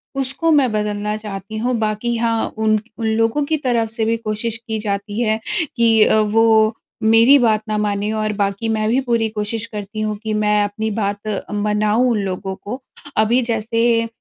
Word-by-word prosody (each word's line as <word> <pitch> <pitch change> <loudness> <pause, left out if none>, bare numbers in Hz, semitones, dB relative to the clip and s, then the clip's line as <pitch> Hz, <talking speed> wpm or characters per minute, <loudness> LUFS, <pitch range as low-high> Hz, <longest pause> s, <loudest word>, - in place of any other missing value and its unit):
उसको 275 +5 0
मैं 270 -6 +4
बदलना 210 0 -2
चाहती 210 0 -7
हूँ। 245 +2 0
बाक़ी 215 +2 -1
हाँ 230 -1 0
उन 215 -1 +2 0.2
उन 225 - -3
लोगों 225 +6 +1
की 315 +1 0
तरफ़ 235 -5 0
से 225 -1 -2
भी 230 +1 +1
कोशिश 225 +1 -3
की 220 -1 -2
जाती 205 +1 -3
है 220 -1 +1 0.4
कि 225 -2 +5
अ, 220 - +4
वो 220 +1 +4 0.3
मेरी 230 +5 +6
बात 220 -3 +3
ना 215 - 0
मानें 210 0 -1
और 215 -1 -1
बाक़ी 200 +2 -1
मैं 215 -1 0
भी 255 +3 +2
पूरी 225 -1 +2
कोशिश 215 +1 -3
करती 210 0 -6
हूँ 215 -1 -2
कि 215 -1 -2
मैं 210 0 +2
अपनी 215 +2 -3
बात 205 0 -2
मनाऊँ 210 +3 +1
उन 215 - +1
लोगों 190 0 -4
को। 250 +8 -7 0.4
अभी 230 +4 +3
जैसे 230 0 +1
220 Hz, 180 wpm, -19 LUFS, 210-230 Hz, 0.4 s, मेरी